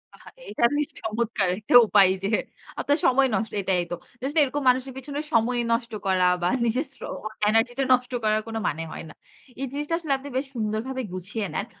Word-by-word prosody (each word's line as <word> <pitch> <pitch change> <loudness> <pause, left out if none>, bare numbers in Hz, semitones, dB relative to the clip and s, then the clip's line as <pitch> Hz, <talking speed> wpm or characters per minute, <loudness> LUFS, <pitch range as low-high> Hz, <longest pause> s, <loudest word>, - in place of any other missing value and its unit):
আহা, - - -15 0.2
এটা - - -3
বেশ 295 -1 0
চমৎকার! 220 -2 -1
একটা 215 - -3
উপায় 200 -2 +6
যে - - +1 0.5
আপনার 290 +1 +2
সময় 265 +1 +5
নষ্ট 225 - -2
এটাই 185 -2 +1
তো। 175 - 0 0.3
Just 280 +4 -3
এরকম 285 +1 -2
মানুষের 255 +1 +1
পেছনে 285 +2 -5
সময় 240 +2 +2
নষ্ট 235 0 0 0.2
করা 185 -1 +3 0.2
বা 175 - +2 0.2
নিজের 255 +6 0
শ্র - - -21 0.5
এনার্জিটা 240 +4 +2
নষ্ট 250 0 +1
করার 215 0 +2
কোন 225 - -6
মানে 160 +2 -2
হয় - - -7
না। - - -12 0.5
এই - - 0
জিনিসটা 295 +3 -3
আসলে 305 -5 -1
আপনি 280 +2 -9
বেশ 265 +2 0
সুন্দরভাবে 225 +4 -2
গুছিয়ে 195 +4 -4
নেন। 200 - -2
235 Hz, 190 wpm, -25 LUFS, 215-265 Hz, 0.5 s, উপায়